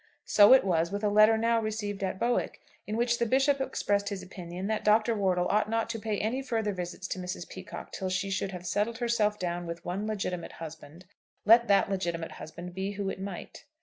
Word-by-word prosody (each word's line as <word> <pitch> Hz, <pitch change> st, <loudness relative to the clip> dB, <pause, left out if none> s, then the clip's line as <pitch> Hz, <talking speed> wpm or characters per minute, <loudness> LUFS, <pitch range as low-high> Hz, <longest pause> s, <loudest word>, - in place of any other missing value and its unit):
So 205 Hz, +1 st, +7 dB
it 265 Hz, -, +7 dB
was 170 Hz, -2 st, +1 dB
with 205 Hz, +1 st, -3 dB
a 210 Hz, -, +3 dB
letter 215 Hz, +2 st, +6 dB
now 230 Hz, +1 st, +2 dB
received 210 Hz, -2 st, -3 dB
at 190 Hz, -1 st, -2 dB
Bowick, 240 Hz, +4 st, 0 dB, 0.3 s
in 215 Hz, -, -2 dB
which 240 Hz, 0 st, +1 dB
the 235 Hz, -, +2 dB
Bishop 270 Hz, +3 st, +3 dB
expressed 205 Hz, -6 st, 0 dB
his 195 Hz, -2 st, -5 dB
opinion 180 Hz, 0 st, -7 dB
that 215 Hz, +1 st, -1 dB
Dr. 215 Hz, +2 st, +4 dB
Wortle 185 Hz, -3 st, +1 dB
ought 210 Hz, +1 st, +2 dB
not 225 Hz, 0 st, 0 dB
to 225 Hz, -, -4 dB
pay 215 Hz, -1 st, -2 dB
any 230 Hz, +7 st, -1 dB
further 225 Hz, -5 st, -1 dB
visits 180 Hz, +1 st, -5 dB
to -, -, -3 dB
Mrs. 180 Hz, -1 st, -5 dB
Peacocke 185 Hz, 0 st, -9 dB
till 190 Hz, -, -3 dB
she 185 Hz, +1 st, -1 dB
should 195 Hz, 0 st, -1 dB
have 180 Hz, -1 st, -8 dB
settled 205 Hz, +5 st, 0 dB
herself 230 Hz, -3 st, +1 dB
down 175 Hz, -2 st, -3 dB
with 170 Hz, 0 st, -7 dB
one 195 Hz, +4 st, -3 dB
legitimate 190 Hz, -5 st, -3 dB
husband, 160 Hz, +1 st, -10 dB, 0.4 s
let 235 Hz, +2 st, +7 dB
that 200 Hz, -1 st, +4 dB
legitimate 170 Hz, -4 st, -2 dB
husband 175 Hz, +3 st, -9 dB
be 190 Hz, +2 st, -3 dB
who 200 Hz, -1 st, -3 dB
it -, -, -7 dB
might. 195 Hz, -2 st, -7 dB
200 Hz, 215 wpm, -29 LUFS, 180-220 Hz, 0.4 s, So